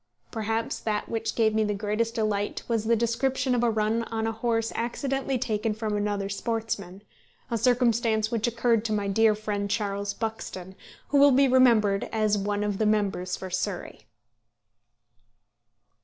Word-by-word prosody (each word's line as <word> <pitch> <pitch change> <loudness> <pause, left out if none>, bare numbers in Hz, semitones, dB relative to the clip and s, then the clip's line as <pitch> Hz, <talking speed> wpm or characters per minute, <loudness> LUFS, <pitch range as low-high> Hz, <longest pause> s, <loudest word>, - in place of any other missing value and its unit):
Perhaps 225 0 -2
that 210 -1 -2
which 225 -1 -2
gave 220 -2 +3
me 220 0 +2
the 210 -1 -1
greatest 215 +3 -1
delight 210 -3 -1
was 225 -2 0
the 230 +1 +3
description 250 +3 0
of 245 - +1
a 240 - +3
run 220 +1 +1
on 225 0 -3
a 225 - 0
horse 225 0 -1
accidentally 270 +3 -2
taken 220 -3 -1
from 215 -1 -2
another 205 -1 -1
sportsman, 200 -3 -4 0.5
a 230 - +1
circumstance 230 -3 +2
which 230 -1 0
occurred 235 -1 +1
to 215 - 0
my 205 -1 -1
dear 215 +2 +3
friend 205 -1 -3
Charles 200 -1 -2
Buxton, 220 -5 -5 0.4
who 285 - +3
will 285 +1 +8
be 275 +1 +5
remembered 230 -6 +4
as 215 -1 +1
one 205 +1 -1
of 205 -2 -2
the 215 - +2
members 195 -4 0
for 190 -1 -7
Surrey. 185 0 -4
220 Hz, 160 wpm, -26 LUFS, 205-230 Hz, 0.5 s, will